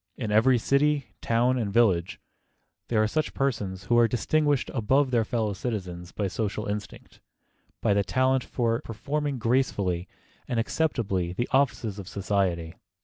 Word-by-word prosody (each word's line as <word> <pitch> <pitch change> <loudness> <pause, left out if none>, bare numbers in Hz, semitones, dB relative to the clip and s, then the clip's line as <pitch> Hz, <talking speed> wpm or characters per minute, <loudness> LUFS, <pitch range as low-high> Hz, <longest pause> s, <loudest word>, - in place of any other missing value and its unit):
In 110 -4 -3
every 120 +4 +5
city, 140 +3 +1
town 120 +2 +2
and 105 -4 -2
village, 95 -6 +2 0.7
there 110 -2 +2
are - - +2
such 155 +7 -2
persons 100 -9 -2
who 120 +4 +3
are 120 - +6
distinguished 145 +4 +1
above 135 +3 +2
their 120 -2 +3
fellow 110 -2 -1
citizens 90 -5 -5
by 100 - -2
social 105 +2 -3
instinct, 105 0 -6 0.6
by 100 - +3
the 100 0 +2
talent 130 +4 +1
for 115 -2 -1
performing 140 +5 -3
gracefully 105 -7 0 0.4
and 120 - -1
acceptably 110 - -1
the 120 +6 -2
offices 115 -6 +1
of 95 - -8
society. 95 -4 -1
115 Hz, 145 wpm, -27 LUFS, 100-130 Hz, 0.7 s, are